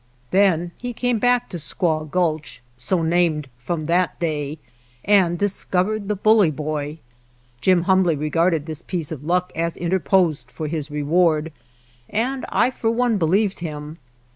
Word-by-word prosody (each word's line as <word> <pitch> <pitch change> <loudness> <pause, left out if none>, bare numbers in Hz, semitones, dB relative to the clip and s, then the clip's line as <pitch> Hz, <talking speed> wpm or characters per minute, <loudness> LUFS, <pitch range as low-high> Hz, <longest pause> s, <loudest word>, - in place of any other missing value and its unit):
Then 180 -3 +3
he 245 0 -4
came 245 -1 0
back 245 +1 +2
to 175 - -5
Squaw 155 -1 -1
Gulch, 155 -7 -1
so 165 +8 -1
named 160 -3 +1
from 155 +5 -3
that 175 +2 +1
day, 150 -3 -2 0.5
and 185 -4 +4
discovered 200 +1 0
the 210 - 0
Bully 215 -2 +4
Boy. 150 0 -4 0.6
Jim 180 +4 +3
humbly 185 -3 +3
regarded 155 +1 +1
this 160 -1 -6
piece 170 -4 -4
of 145 -3 -6
luck 180 +3 0
as 165 0 -2
interposed 170 -5 +1
for 125 +5 -6
his 155 -1 -4
reward, 155 +2 +1 0.6
and 255 +5 -1
I 255 - +2
for 225 -3 -1
one 230 -2 +1
believed 190 +4 +1
him. 155 -1 -6
170 Hz, 145 wpm, -22 LUFS, 155-190 Hz, 0.6 s, and